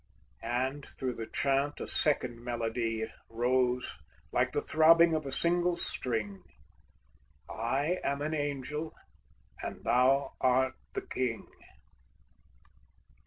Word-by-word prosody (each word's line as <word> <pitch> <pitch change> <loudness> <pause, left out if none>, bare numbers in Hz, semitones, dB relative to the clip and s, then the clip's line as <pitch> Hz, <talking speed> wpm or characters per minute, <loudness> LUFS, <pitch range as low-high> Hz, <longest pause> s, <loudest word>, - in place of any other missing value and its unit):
And 130 +4 -1
through 130 -2 -4
the 115 -1 -6
chant 140 +1 +1
a - - -3
second 125 -6 0
melody 115 -2 -1 0.2
Rose 125 +2 +1 0.3
like - - +2
the - - +1
throbbing 165 +1 +6
of 155 -3 -1
a - - -4
single 175 +4 +2
string: 110 - -2 1.1
"I 140 +10 0
am 140 +1 -1
an 155 +1 -1
Angel, 145 +1 -3 0.7
and - - -6
thou 130 +3 +3
art 130 +1 +3 0.2
the - - -2
King!" 120 -3 -2
130 Hz, 110 wpm, -31 LUFS, 120-145 Hz, 1.1 s, throbbing